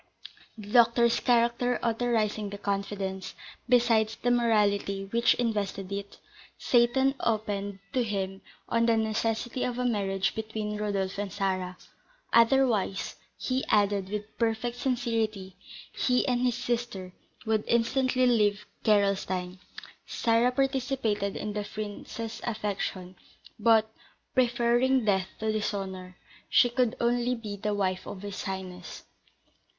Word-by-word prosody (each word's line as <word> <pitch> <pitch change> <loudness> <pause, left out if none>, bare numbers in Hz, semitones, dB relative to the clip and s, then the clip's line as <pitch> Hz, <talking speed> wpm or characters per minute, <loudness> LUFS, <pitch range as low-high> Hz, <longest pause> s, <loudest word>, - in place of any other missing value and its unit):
The 210 -2 -9
doctor's 235 0 +5
character 240 0 +2
authorising 225 -3 0
the 200 - -6
confidence, 195 -1 -3 0.3
besides 230 -3 +3
the 245 - 0
morality 205 -4 +2
which 235 +1 +3
invested 205 -5 -2
it, 200 0 -5 0.4
Seyton 260 +3 +3
opened 205 -3 -1 0.2
to 255 - +2
him 195 -3 -3 0.3
on 230 0 +2
the 230 -1 +4
necessity 225 +3 -1
of 245 -1 -2
a 250 - -1
marriage 195 -5 0
between 220 -1 -4
Rodolph 200 -2 -2
and 205 -1 -3
Sarah; 185 -2 -2 0.6
otherwise, 230 -5 +3 0.2
he 260 +1 -1
added, 200 -2 +2
with 210 +1 -5
perfect 230 +1 0
sincerity, 225 -7 -1 0.4
he 250 -1 +1
and 245 -1 +1
his 250 -2 +2
sister 235 -7 -3 0.3
would 220 -1 +1
instantly 255 +2 +2
leave 210 -4 +2 0.2
Gerolstein. 190 -3 +1 0.5
Sarah 230 +1 +2
participated 255 -6 0
in 210 0 -4
the 210 0 -2
prince's 215 +2 -6
affection, 200 -4 -3 0.4
but, 220 0 +5 0.5
preferring 245 0 +2
death 190 -3 +2
to 220 0 +1
dishonour, 190 -4 -4 0.3
she 245 - +5
could 245 -1 +1
only 240 +1 +1
be 215 -3 -6
the 205 +1 -2
wife 185 -2 -1
of 200 -1 -7
his 200 -1 -5
highness. 185 -2 -6
220 Hz, 120 wpm, -28 LUFS, 200-240 Hz, 0.6 s, doctor's